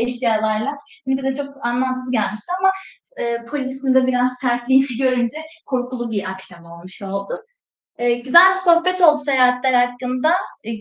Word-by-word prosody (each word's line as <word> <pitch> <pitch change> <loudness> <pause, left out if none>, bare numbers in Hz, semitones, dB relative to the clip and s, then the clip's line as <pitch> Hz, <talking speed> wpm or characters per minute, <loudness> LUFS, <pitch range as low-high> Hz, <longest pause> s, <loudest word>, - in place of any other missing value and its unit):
eşyalarla? 230 +1 -1 0.3
Bize 265 0 -1
de 270 0 0
çok 280 -2 -7
anlamsız 255 +1 -2
gelmişti 215 - -2
ama, 385 0 +4 0.5
ııı, 235 0 -3
polisin 265 -1 -2
de 260 -1 +4
biraz 250 0 +1
sertliğini 255 +1 +2
görünce 255 -1 0 0.3
korkulu 250 -2 -3
bir 200 -3 -3
akşam 185 -2 -12
olmuş 170 +3 -13
oldu. 200 - -5 0.6
Eee, 240 0 +2
güzel 270 +10 +6
bir 375 - -1
sohbet 365 +1 +3
oldu 305 -4 +5
seyahatler 250 -2 +3
hakkında. 250 +5 -1 0.3
E, 230 - -6
250 Hz, 145 wpm, -19 LUFS, 235-270 Hz, 0.6 s, güzel